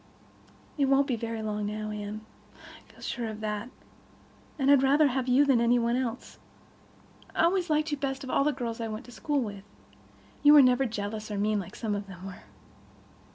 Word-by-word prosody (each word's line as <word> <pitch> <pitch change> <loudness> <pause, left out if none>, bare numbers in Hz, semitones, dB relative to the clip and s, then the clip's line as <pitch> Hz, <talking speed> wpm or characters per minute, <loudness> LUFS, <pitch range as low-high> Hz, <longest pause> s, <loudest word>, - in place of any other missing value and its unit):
"It—it 280 - +4
won't 275 +1 +4
be 265 -4 -1
very 230 -1 -4
long 210 -1 -2
now, 215 0 -4
Anne. 210 0 -5 0.3
I - - -17
feel - - -19
sure 235 -2 -3
of 215 -1 -6
that. 210 +2 -3 0.9
And 275 -1 +3
I'd 280 -2 +6
rather 285 +2 +4
have 260 0 -2
you 260 +3 +5
than 265 -4 +3
any 235 +1 +4
one 235 0 +1
else. 250 -1 -4 1.0
I - - +2
always 355 +1 +2
liked 305 +1 +1
you 295 - -1
best 270 0 -3
of 260 - -5
all - - +3
the 300 - +2
girls 240 -4 -4
I 225 - -2
went 215 +3 -6
to 245 - -13
school 290 +3 -1
with. 205 -4 -6 0.8
You 295 0 +7
were 295 -2 +9
never 255 +1 +3
jealous, 215 0 -5
or 205 - -3
mean, 210 +1 +1
like 185 - -8
some 215 -2 -3
of 205 0 -4
them 185 -1 -10
were. 190 -2 -9
235 Hz, 205 wpm, -28 LUFS, 215-275 Hz, 1.0 s, were